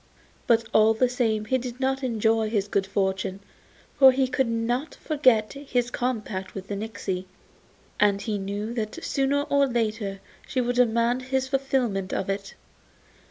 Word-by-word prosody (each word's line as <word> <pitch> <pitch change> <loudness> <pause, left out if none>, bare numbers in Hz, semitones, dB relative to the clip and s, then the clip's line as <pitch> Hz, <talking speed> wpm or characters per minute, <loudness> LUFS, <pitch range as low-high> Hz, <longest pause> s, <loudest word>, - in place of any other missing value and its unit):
But 230 -1 +4
all 220 +1 +5
the 255 +3 +3
same 225 -4 0
he 260 +4 +1
did 250 0 -7
not 265 +1 0
enjoy 225 -2 +1
his 205 -3 0
good 200 -1 0
fortune, 190 -1 -1 0.6
for 265 -1 +9
he 260 0 +1
could 255 0 0
not 235 +5 -1
forget 255 -8 +2
his 250 -4 -2
compact 215 -7 -3
with 195 -1 -7
the 205 - -2
nixy, 200 -3 -4 0.7
and 200 -1 +4
he 205 0 -2
knew 205 +3 -4
that 215 -3 -4
sooner 280 +1 +1
or 280 -1 +2
later 215 -5 -2 0.3
she 260 - -1
would 245 0 0
demand 235 +1 +2
his 265 +1 -1
fulfilment 260 -8 -1
of 195 - -1
it. 195 0 -5
230 Hz, 160 wpm, -25 LUFS, 205-255 Hz, 0.7 s, for